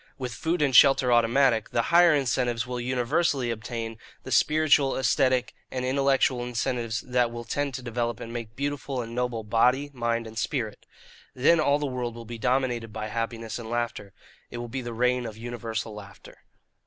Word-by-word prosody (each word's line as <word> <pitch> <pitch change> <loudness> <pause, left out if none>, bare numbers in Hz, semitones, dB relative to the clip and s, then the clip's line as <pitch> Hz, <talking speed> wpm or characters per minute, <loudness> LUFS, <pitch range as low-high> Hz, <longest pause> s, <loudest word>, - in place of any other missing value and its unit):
With 125 -4 -4
food 160 +5 -1
and 135 -3 +1
shelter 135 -2 +6
automatic, 120 0 +3
the 115 - 0
higher 170 -2 +7
incentives 125 -3 0
will 125 0 -4
universally 125 +1 0
obtain 115 0 -5 0.2
the 130 - -8
spiritual, 150 -1 +3
aesthetic, 130 -1 +2 0.2
and 130 -1 -3
intellectual 135 -2 +2
incentives 120 -2 -2
that 125 -1 +1
will 120 0 -7
tend 140 +3 -2
to 130 - -6
develop 120 -2 -2
and 115 - -7
make 115 -2 -6
beautiful 140 -2 -3
and 115 0 -9
noble 125 -2 -2
body, 125 +6 +2
mind, 115 -2 -1
and 110 0 -6
spirit. 110 -2 -3 0.5
Then 155 +6 +4
all 145 -2 +3
the 150 - -3
world 125 -3 -3
will 115 0 -9
be 115 +1 -8
dominated 125 -2 0
by 110 0 -5
happiness 115 +1 -4
and 115 -1 -8
laughter. 120 -4 -3 0.4
It - - -7
will 120 0 -5
be 130 +3 -4
the 120 -1 -6
reign 125 +1 +1
of 110 -1 -9
universal 115 -1 -5
laughter. 100 -2 -12
120 Hz, 180 wpm, -26 LUFS, 115-130 Hz, 0.5 s, higher